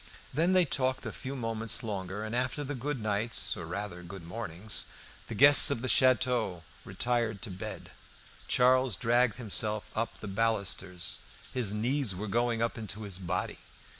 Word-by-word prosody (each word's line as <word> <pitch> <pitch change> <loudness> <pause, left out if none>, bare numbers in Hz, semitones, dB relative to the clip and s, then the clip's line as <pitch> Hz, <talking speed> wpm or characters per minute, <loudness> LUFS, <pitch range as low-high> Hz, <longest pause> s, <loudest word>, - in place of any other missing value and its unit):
Then 165 +7 +2
they 185 -2 +4
talked 130 -2 -1
a - - -4
few 135 +1 -6
moments 115 -2 -1
longer, 100 -1 -4
and 110 +2 -4
after 130 +4 -1
the 145 +1 -5
goodnights, 115 -5 -1
or 90 -5 -7
rather 90 0 -5
good 90 +1 -10
mornings, 105 +1 0 0.4
the - - -6
guests 145 +2 +10
of 130 -4 -2
the - - -1
château 120 -7 +2 0.2
retired 115 -4 -2
to 110 - -5
bed. 90 - -8 0.6
Charles 130 -2 +3
dragged 120 +1 +2
himself 110 -2 -3
up 115 +1 -2
by - - -17
the 105 - -6
balusters. 100 -4 -1 0.3
His 120 -6 0
"knees 120 0 0
were 105 +4 -5
going 115 +2 0
up 115 0 -3
into 110 0 -6
his 100 -3 -4
body." 90 0 -3
115 Hz, 165 wpm, -29 LUFS, 100-125 Hz, 0.6 s, guests